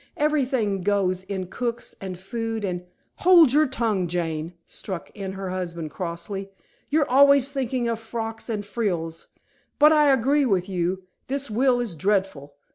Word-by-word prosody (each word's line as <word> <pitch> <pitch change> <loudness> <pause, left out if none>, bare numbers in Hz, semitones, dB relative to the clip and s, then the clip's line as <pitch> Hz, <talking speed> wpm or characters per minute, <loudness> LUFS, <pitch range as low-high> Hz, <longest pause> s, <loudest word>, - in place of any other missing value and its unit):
Everything 260 -10 +1
goes 185 -1 +1
in 190 -1 -4
cooks 235 +5 -4
and 190 -2 -5
food 225 +2 -4
and 180 -1 -4
" - - -45
"Hold 340 -7 +7
your 305 +1 +5
tongue, 225 -8 0
Jane," 165 -1 -3
struck 185 -4 -7
in 195 -2 -5
her 190 -1 -5
husband 170 -4 -4
crossly. 185 +3 -5 0.4
"You're 300 0 +2
always 280 0 +5
thinking 260 -3 -1
of 230 -1 -1
frocks 225 0 -5
and 210 -2 -2
frills. 175 -7 -3 0.5
But 300 +1 +7
I 300 -2 +5
agree 270 +2 +3
with 190 -4 +1
you 185 0 -2 0.2
this 275 -2 -2
will 245 +2 +3
is 235 -6 -2
dreadful. 165 -5 -1
205 Hz, 155 wpm, -24 LUFS, 185-255 Hz, 0.5 s, Hold